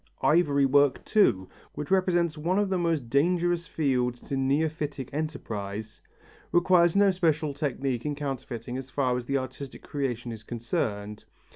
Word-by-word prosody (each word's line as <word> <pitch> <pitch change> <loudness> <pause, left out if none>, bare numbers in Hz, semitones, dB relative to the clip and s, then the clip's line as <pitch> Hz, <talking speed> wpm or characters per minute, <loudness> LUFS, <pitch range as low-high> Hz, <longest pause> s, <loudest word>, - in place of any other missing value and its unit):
Ivory 140 -1 +4
work 140 0 +3
too, 95 - +3 0.3
which 150 +4 -5
represents 175 -4 +2
one 170 +5 0
of 205 -1 +1
the 190 - +2
most 165 -7 0
dangerous 170 +5 +1
fields 125 -6 0
to 140 - -4
neophytic 145 0 -1
enterprise, 110 -8 -5 0.5
requires 175 0 +4
no 200 -1 +5
special 160 -5 +1
technique 135 -4 -2
in 150 -1 -2
counterfeiting 130 -4 -5
as 130 0 -9
far 130 -2 0
as 125 -1 -4
the 140 - +1
artistic 130 +1 -7
creation 125 -4 -3
is 110 -2 -8
concerned. 105 -2 -3
140 Hz, 145 wpm, -27 LUFS, 125-165 Hz, 0.5 s, no